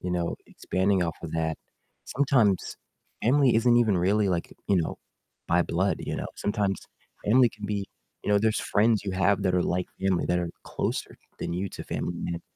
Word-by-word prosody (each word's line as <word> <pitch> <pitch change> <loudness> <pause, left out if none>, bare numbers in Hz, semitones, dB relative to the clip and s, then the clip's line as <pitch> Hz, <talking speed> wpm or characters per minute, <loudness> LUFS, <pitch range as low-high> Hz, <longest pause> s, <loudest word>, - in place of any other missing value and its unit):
you 90 - -3
know, 85 -1 -1
expanding 95 0 0
off 85 -2 -2
of 80 - -6
that, 80 -1 -1 0.5
sometimes 125 -9 +2 0.5
family 130 +1 +4
isn't 120 +1 +4
even 110 -6 +3
really 100 +3 +2
like, 85 -2 -1
you 100 - +3
know, 85 - -1 0.5
by 85 +1 +4
blood, 95 +4 0
you - - -3
know? - - -3
Sometimes 100 -2 -1 0.4
family 120 +3 +5
can 105 -1 -8
be 100 -1 -2 0.4
You - - -1
know, 100 - +5
there's 110 +1 +1
friends 110 0 +4
you 95 - -2
have 95 +2 +2
that 90 -2 +1
are 90 - +3
like 90 0 -1
family, 95 -2 +1
that 90 0 +1
are 85 -1 -2 0.2
closer - - -3 0.3
than - - -3
you 95 +3 -2
to - - -8
family 85 - -3
mem 85 0 -4
95 Hz, 190 wpm, -27 LUFS, 90-105 Hz, 0.5 s, family